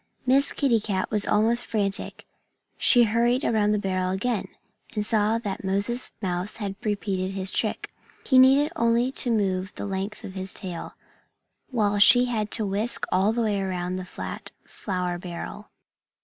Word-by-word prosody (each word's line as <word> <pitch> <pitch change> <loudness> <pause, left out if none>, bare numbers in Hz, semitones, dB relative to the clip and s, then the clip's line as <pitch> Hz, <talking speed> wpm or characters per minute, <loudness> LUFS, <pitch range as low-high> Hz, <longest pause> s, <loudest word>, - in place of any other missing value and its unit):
Miss 270 +2 +4
Kitty 250 -5 +2
Cat 195 -3 -2
was 210 -1 +1
almost 230 +3 +2
frantic. 200 -4 -2 0.5
She 245 -2 +5
hurried 235 +3 +1
around 215 -2 +2
the 210 - +2
barrel 185 -2 -1
again, 205 +3 -1 0.5
and 210 -1 -1
saw 215 0 +2
that 205 -5 -5
Moses 200 +6 -1
Mouse 180 +2 -2
had 200 -3 -4
repeated 195 -3 -2
his 190 -1 -1
trick. - - -2 0.3
He 260 -2 +5
needed 275 +4 +5
only 235 -2 +2
to 260 - 0
move 190 -4 0
the - - -5
length 195 +1 -4
of 190 - -7
his 190 0 -4
tail, 180 -4 -6 0.7
while 210 -5 +1
she 245 +4 +8
had 220 -4 -2
to 220 0 0
whisk 205 +4 0
all 190 +3 +3
the 235 +1 -1
way 205 -3 0
around 185 -1 -3
the 185 - -5
fat 185 - -7 0.2
flour 180 -3 -4
barrel. 180 +4 -7
205 Hz, 165 wpm, -25 LUFS, 190-235 Hz, 0.7 s, she